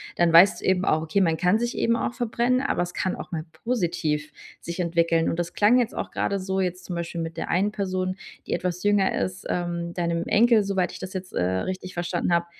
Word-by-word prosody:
dann 175 -1 +3
weißt 175 +4 +7
du - - -6
eben 190 +1 +2
auch: 155 - +2
„Okay, 160 +5 0
man 165 -3 +2
kann 180 +5 +3
sich 240 +1 -2
eben 230 - +2
auch 240 - -2
verbrennen, 245 +1 0
aber 280 - 0
es 175 - -6
kann 185 - -1
auch - - -9
mal 160 -2 -3
positiv 170 -10 -2 0.3
sich 170 +2 -6
entwickeln“. 170 -1 +2
Und 165 - -3
das 170 -1 -3
klang 225 +5 +4
jetzt 240 -1 -1
auch - - -4
grade 200 - -1
so, 190 0 -2
jetzt 180 -1 -2
zum 180 - -5
Beispiel 170 0 -4
mit 165 0 -5
der - - -4
einen 195 +4 +2
Person, 185 -2 -2 0.3
die - - -3
etwas 180 0 -2
jünger 205 -2 +3
ist, 185 0 -3
ähm, 170 -1 -2
deinem 170 -1 -1
Enkel, 230 0 +5
soweit 190 -2 0
ich - - -9
das 185 0 -7
jetzt, 185 -1 -6
äh, - - -1
richtig 185 - -3
verstanden 175 0 -1
habe, 170 0 +2
180 Hz, 235 wpm, -25 LUFS, 170-200 Hz, 0.3 s, weißt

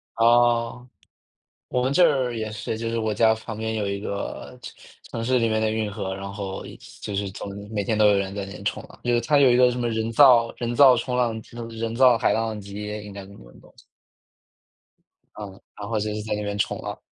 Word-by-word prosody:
哦， 120 +1 +3 0.8
我 125 0 -1
们 135 +2 0
这 180 - +5
儿 130 -7 +2
也 110 -1 -4
是。 110 +1 -4
就 115 0 -3
是 115 - -2
我 110 -1 -1
家 110 +1 +4
旁 110 0 -8
边 110 0 -3
有 105 -2 -1
一 100 0 -3
个 100 -1 -6
城 - - -8 0.4
城 115 -1 -4
市 130 +1 +2
里 115 - +2
面 110 0 0
的 110 - +1
运 110 -1 -2
河， 100 -2 -4
然 100 0 -7
后 100 -2 -6 0.4
就 105 - -4
是 100 0 -2
总 100 - -7 0.2
每 105 -2 -1
天 110 +2 0
都 105 -1 +5
有 100 - +4
人 100 0 -2
在 100 - -3
那 100 - -10
边 90 - -10
冲 - - -1
浪。 - - -16
就 120 - +1
是 120 - +2
它 145 +5 +2
有 135 -3 +6
一 - - +4
个 125 -1 +6
什 120 - -5
么 120 - 0
人 110 0 -2
造 120 -2 +6
人 120 0 -3
造 130 -2 +7
冲 125 +1 -2
浪 120 -3 +1 0.2
嗯， 115 -1 -6
人 115 0 -4
造 125 -2 +6
海 115 - +2
浪 110 -1 -2
机 100 +1 -7 0.2
应 105 - -9
该 100 - -7
什 - - -15
么 - - -15
那 - - -17
种。 - - -20 1.6
嗯。 100 -2 -9 0.2
然 100 - -6
后 110 -2 -1
就 105 0 -2
是 105 - -4
在 110 -1 -3
那 105 - -4
边 100 0 -3
冲 100 - -1
浪， - - -6
110 Hz, 265 characters per minute, -24 LUFS, 105-120 Hz, 1.6 s, 造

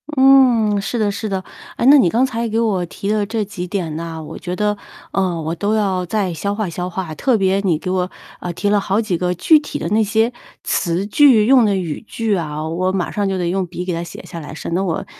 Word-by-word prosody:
嗯， 255 -6 +5
是 195 +5 -3
的 210 -2 +1
是 215 +2 -4
的。 190 -2 -2 0.3
啊， - - -3
那 285 +3 +8
你 190 -11 +4
刚 240 +8 +2
才 235 -3 -2
给 225 0 -2
我 200 -6 +1
提 195 +3 -6
的 210 -1 +1
这 220 +1 -2
几 190 -3 -6
点 175 -4 -3
呐， 165 -1 -6
我 - - -8
觉 180 0 -4
得， 210 +1 0 0.3
呃， 185 -3 0
我 160 +1 -3
都 205 +5 0
要 190 -4 0
再 195 -2 -1
消 200 +5 -2
化 215 -4 -2
消 180 +2 -4
化， 180 -3 -5
特 250 - +1
别 195 -1 +2
你 185 -5 +1
给 185 - -5
我， 185 -1 0 0.3
呃， 175 - -5
提 205 +4 -1
了 205 0 +3
好 200 +2 0
几 205 -6 -1
个 180 +1 0
具 310 - +5
体 295 - -6
的 170 - -3
那 215 +3 +3
些 220 +2 +2 0.3
词 175 +3 0
句 230 0 +5
用 255 -1 +6
的 205 -2 +2
语 170 -5 -3
句 225 -3 -1
啊， 155 -3 -3
我 180 +3 -1
马 185 -2 -1
上 205 -1 -1
就 190 -1 -1
得 175 -2 -1
用 190 0 -1
笔 175 +1 -5
给 180 -1 -3
它 165 - -2
写 170 -1 -9
下 170 - -8
来， 150 -1 -9
省 165 - -5
得 185 +3 +1
我 165 -3 -2
195 Hz, 270 characters per minute, -19 LUFS, 175-215 Hz, 0.3 s, 那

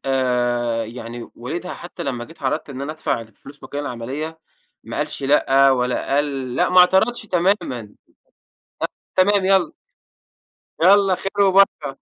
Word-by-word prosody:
آآ، 120 -3 0
يعني 120 +1 -8
والدها 165 +9 -5
حتّى 175 0 -9
لمّا 125 -5 -3
جيت 165 0 -17
عرضت 140 +2 -2
إن 135 0 -7
أنا 145 +2 -4
أدفع 120 -6 -2
فلوس 140 +6 -16
مكان 145 - -5
العمليّة، 145 +5 -5 0.5
ما - - -7
قالش - - -3
لأ، 135 -1 +4
والّا 125 +1 0
قال 135 -3 -1
لأ - - +2
ما 180 0 +4
اعترضتش 220 +7 +3
تمامًا. 175 - -1 1.2
تمام 195 +1 +3
يلّا 190 -4 +3 1.1
يلّا 195 +1 +6
خير 200 +2 0
وبركة، 185 -8 +3
140 Hz, 135 wpm, -21 LUFS, 125-180 Hz, 1.2 s, يلّا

